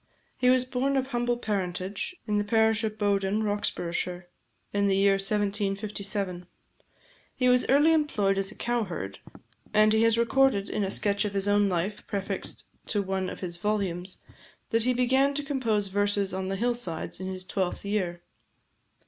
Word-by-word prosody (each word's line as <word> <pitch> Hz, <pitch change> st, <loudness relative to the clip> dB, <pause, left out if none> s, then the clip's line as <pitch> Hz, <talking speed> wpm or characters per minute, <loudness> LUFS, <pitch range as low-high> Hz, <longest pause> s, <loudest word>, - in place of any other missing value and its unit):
He 250 Hz, 0 st, +2 dB
was 255 Hz, 0 st, +4 dB
born 265 Hz, +2 st, 0 dB
of 265 Hz, 0 st, -1 dB
humble 240 Hz, -1 st, 0 dB
parentage, 195 Hz, -, -3 dB
in 210 Hz, -1 st, +1 dB
the -, -, +1 dB
parish 220 Hz, +1 st, +3 dB
of 215 Hz, -1 st, -2 dB
Bowden, 205 Hz, 0 st, +1 dB
Roxburghshire, 180 Hz, -3 st, -2 dB, 0.5 s
in 200 Hz, 0 st, +2 dB
the 195 Hz, -, +3 dB
year 200 Hz, +1 st, +4 dB
1757. 200 Hz, -2 st, -1 dB, 0.9 s
He 250 Hz, -, +1 dB
was 250 Hz, 0 st, +4 dB
early 290 Hz, +4 st, +5 dB
employed 210 Hz, -11 st, +1 dB
as 195 Hz, 0 st, -1 dB
a 210 Hz, -, -12 dB
cowherd; 185 Hz, -, -3 dB, 0.6 s
and 215 Hz, 0 st, +5 dB
he 220 Hz, -, +3 dB
has 230 Hz, 0 st, +4 dB
recorded, 235 Hz, -3 st, +2 dB
in 210 Hz, -, 0 dB
a 195 Hz, -, -1 dB
sketch 200 Hz, 0 st, +1 dB
of 205 Hz, -1 st, -3 dB
his 195 Hz, 0 st, -1 dB
own 205 Hz, 0 st, +3 dB
life 185 Hz, +3 st, -2 dB
prefixed 200 Hz, -2 st, -4 dB, 0.2 s
to 205 Hz, -3 st, 0 dB
one 190 Hz, -1 st, -2 dB
of -, -, -8 dB
his 175 Hz, -2 st, -5 dB
volumes, 190 Hz, -2 st, -2 dB, 0.5 s
that 230 Hz, -1 st, +2 dB
he 255 Hz, -, +3 dB
began 265 Hz, +3 st, +3 dB
to 290 Hz, -, -1 dB
compose 230 Hz, -8 st, 0 dB
verses 205 Hz, -1 st, +1 dB
on 190 Hz, 0 st, -2 dB
the 195 Hz, -, -1 dB
hill 240 Hz, +5 st, +1 dB
sides 175 Hz, -11 st, -4 dB
in 185 Hz, -, -4 dB
his 185 Hz, -1 st, -5 dB
twelfth 185 Hz, 0 st, -2 dB
year. 180 Hz, -4 st, -2 dB
205 Hz, 170 wpm, -27 LUFS, 190-235 Hz, 0.9 s, early